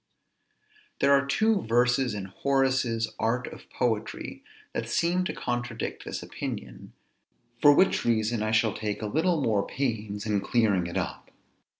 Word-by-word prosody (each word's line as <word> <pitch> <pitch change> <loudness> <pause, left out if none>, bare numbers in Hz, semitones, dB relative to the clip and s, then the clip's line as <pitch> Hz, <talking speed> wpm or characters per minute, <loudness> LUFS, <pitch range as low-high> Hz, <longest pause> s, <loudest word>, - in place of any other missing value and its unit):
There 140 0 +5
are 140 0 +3
two 215 +7 +2
verses 125 +1 +2
in 100 -2 -4
Horace's 130 0 0
Art 125 +3 0
of - - -11
Poetry 115 -3 -2 0.3
that 115 0 -3
seem 175 +8 +1
to - - -2
contradict 120 -1 -4
this - - -5
opinion; 65 -3 -7 0.7
for 145 - +8
which 190 - +3
reason 115 -1 +1
I 110 - 0
shall 110 0 +2
take 105 0 -4
a - - -1
little 160 - +1
more 105 -4 +2
pains 110 -6 -3
in 105 -2 +1
clearing 100 -8 +2
it 85 - -4
up. - - -4
115 Hz, 150 wpm, -27 LUFS, 110-135 Hz, 0.7 s, for